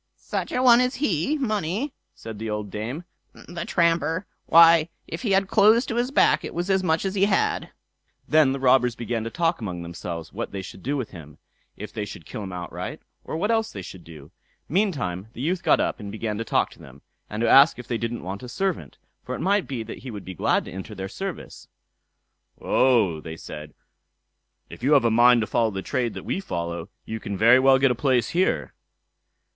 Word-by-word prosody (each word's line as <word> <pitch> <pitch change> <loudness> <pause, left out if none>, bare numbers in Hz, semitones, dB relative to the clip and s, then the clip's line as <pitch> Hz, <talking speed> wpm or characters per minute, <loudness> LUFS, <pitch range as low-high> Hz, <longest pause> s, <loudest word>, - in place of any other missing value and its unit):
"Such - - -4
a 250 - 0
one 245 -1 +7
as 250 +1 0
he 250 - 0
money!" 215 - -2 0.2
said 110 -2 -9
the 110 0 -4
old 105 -2 -4
dame, 120 - -5 0.3
"the 175 -1 -8
tramper! 165 +1 +1 0.2
Why, 165 0 +7 0.2
if - - -6
he 215 -6 0
had 195 0 +3
clothes 220 +5 +5
to 230 - -4
his 245 +1 +1
back, 275 - +3
it - - -7
was 175 +3 -1
as 190 0 +3
much 160 +1 +1
as 190 - -1
he 200 -1 +3
had." 200 -1 0 0.6
Then 155 -3 +4
the 135 - -3
robbers 125 -2 +3
began 115 -1 -3
to - - -3
talk 165 +3 0
among 90 -5 -5
themselves 85 -1 -7
what - - -4
they 95 -1 -5
should 95 - -10
do 140 +7 -2
with 130 -5 -4
him; 75 -5 -12 0.4
if 105 +1 -8
they 110 - -3
should 90 -5 -9
kill 105 - -7
him 95 -2 -6
outright, 90 -1 -6 0.2
or - - -5
what 205 +7 0
else 225 -1 +1
they - - -7
should 90 -2 -10
do. 75 -3 -13 0.4
Meantime 140 - -1
the 120 - -8
youth 170 +5 -1
got - - +3
up - - -1
and 100 -2 -7
began 110 0 -3
to - - -1
talk - - 0
to - - -17
them, 70 +1 -15 0.3
and 105 +1 -4
to 115 - +2
ask 140 +6 +7
if 125 -1 -9
they 115 -2 -2
didn't 115 +1 -4
want 95 +2 -5
a 125 - -8
servant, 165 - -3 0.3
for - - -4
it - - -7
might 200 +1 +1
be 125 -5 -4
that 110 - -8
he 130 - -9
would 105 -4 -8
be 95 - -6
glad - - +1
to - - -9
enter 95 +4 -7
their 95 0 -5
service. 195 - -7 0.9
"Oh", 110 -11 +2
said 75 -2 -9 1.0
they, - - -13
"if - - -11
you 140 +5 +3
have 140 -4 +5
a 115 - +3
mind 120 +1 +6
to - - 0
follow 115 +1 +1
the 95 -2 -5
trade 125 -4 -2
that - - -7
we - - -2
follow, 85 - -4 0.2
you 110 - -5
can 100 -2 -5
very 115 +5 +6
well 135 0 +5
get 135 -1 +3
a - - +3
place 125 -1 +1
here." 185 +2 0
125 Hz, 220 wpm, -24 LUFS, -, 1.0 s, one